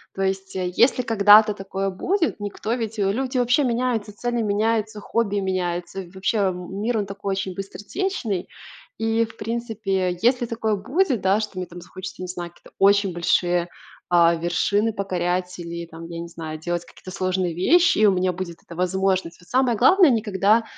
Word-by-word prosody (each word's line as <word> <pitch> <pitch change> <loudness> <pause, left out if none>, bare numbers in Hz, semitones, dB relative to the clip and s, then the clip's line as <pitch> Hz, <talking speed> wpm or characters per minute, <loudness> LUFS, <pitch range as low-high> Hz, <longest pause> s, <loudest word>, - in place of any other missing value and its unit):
То 195 - -4
есть, 190 0 -2
э, 180 -1 -2
если 250 +1 +4
когда-то 215 -2 +6
такое 195 0 -3
будет, 330 - -1
никто 205 +2 -3
ведь, 225 -2 -3
э 195 0 +2
люди 255 +3 -2
вообще 245 +4 +3
меняются, 235 -3 -1
цели 240 +1 -1
меняются, 215 0 0
хобби 205 -2 0
меняются, 185 -1 -2
вообще 195 +3 -1
м 190 0 -2
мир 230 +1 0
он 205 - -1
такой 200 0 -5
очень 190 -1 -2
быстротечный. 205 - -3 0.5
И, 225 +1 +1
в 225 0 -14
принципе, 210 -5 -2
если 245 +1 +3
такое 225 -2 -1
будет, 260 - 0
да, 190 +2 +3
что 210 -3 -6
мне 185 - -2
там 175 0 -11
захочется 185 +1 -9
не 185 - -4
знаю 175 -1 -6
какие-то - - -19
очень 200 -1 +4
большие, 175 0 +1 0.4
а, 170 -1 +5
вершины 200 +6 0
покорять 180 -2 -2
или 170 -1 -6
там, 165 0 -10
я 170 - -6
не 170 - -6
знаю, 160 -2 -7
делать 175 +1 -3
какие-то 185 - -13
сложные 185 -2 -1
вещи 340 - +4
и 215 - +5
у 205 - +6
меня 185 0 +1
будет 175 -2 -6
эта 170 - -12
возможность. 185 -1 0
Вот 175 - -20
самое 255 -2 +2
главное 325 - +6
никогда, 215 0 +2
195 Hz, 180 wpm, -23 LUFS, 180-225 Hz, 0.5 s, когда-то